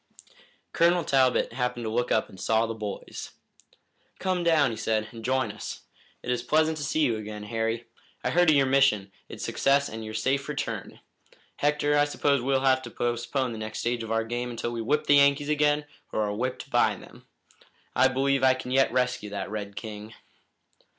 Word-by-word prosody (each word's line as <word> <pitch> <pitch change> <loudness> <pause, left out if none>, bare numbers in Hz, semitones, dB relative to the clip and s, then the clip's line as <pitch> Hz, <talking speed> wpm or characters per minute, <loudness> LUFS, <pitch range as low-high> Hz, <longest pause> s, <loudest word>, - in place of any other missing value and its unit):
Colonel 170 +1 +3
Talbot 130 -3 +2
happened 125 -2 -2
to - - -1
look 120 +2 0
up 110 - +2
and 95 - -13
saw 110 0 +2
the 115 - -4
boys. 105 -2 -7 0.8
"Come 185 -2 -1
down," 155 -6 +4
he - - -4
said, 110 -1 -1
"and 115 -2 -10
join 130 -2 0
us. 110 - -7 0.4
It - - -2
is 125 -1 0
pleasant 155 +5 +2
to 150 - -4
see 155 +3 0
you 120 -7 +2
again, 105 -1 -7
Harry. 115 +2 -2 0.4
I - - 0
heard 175 0 +4
of 155 - +6
your 140 -1 +4
mission, 105 -7 +3 0.2
its - - -6
success 140 +1 +2
and 110 0 -7
your 110 0 -7
safe 135 +6 0
return. 150 - -4 0.6
Hector, 145 0 +1
I 145 - +5
suppose 145 -2 +1
we'll 135 +1 +1
have 130 -1 +3
to 125 - -8
postpone 120 +2 -1
the 110 - -6
next 110 0 -5
stage 120 0 -1
of 115 0 -6
our 115 0 +1
game 120 +2 -3
until 120 0 -4
we 115 -1 -3
whip 145 +7 0
the 145 - +6
Yankees 140 +1 +4
again 150 0 +2 0.3
or 110 - 0
are 105 -1 -1
whipped 125 +4 -4
by - - +3
them. - - -15 0.7
I 130 - +5
believe 135 +1 +1
I 130 0 +5
can 130 -1 -7
yet 135 -1 +3
rescue 125 -4 0
that 100 0 -5
red 100 -2 -5
king." 110 0 -8
125 Hz, 195 wpm, -27 LUFS, 110-140 Hz, 0.8 s, of